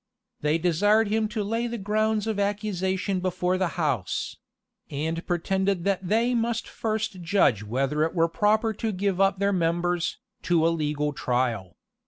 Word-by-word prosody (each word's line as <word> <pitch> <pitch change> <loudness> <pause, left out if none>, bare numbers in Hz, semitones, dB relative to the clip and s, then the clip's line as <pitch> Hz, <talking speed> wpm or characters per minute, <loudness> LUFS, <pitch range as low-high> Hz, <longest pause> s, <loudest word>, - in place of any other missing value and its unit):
They 150 +2 +1
desired 200 +6 +3
him 220 0 +1
to 215 -1 -3
lay 230 +4 -1
the 235 0 -4
grounds 215 +1 0
of 220 -2 -2
accusation 200 -2 -1
before 180 0 0
the 185 -1 -1
house; 135 - -1 0.5
and 160 +4 -3
pretended 190 +1 0
that 195 -1 0
they 230 +5 +2
must 235 -1 -1
first 220 -4 -3
judge 170 - +3
whether 135 +7 -1
it 165 +3 -1
were 165 -1 +3
proper 215 +5 +2
to 220 +1 -2
give 195 -1 -1
up 195 0 +3
their 200 +1 +1
members, 175 0 0 0.2
to 170 -2 +2
a - - +5
legal 150 -2 -1
trial. 120 -9 -1
185 Hz, 160 wpm, -26 LUFS, 165-210 Hz, 0.5 s, a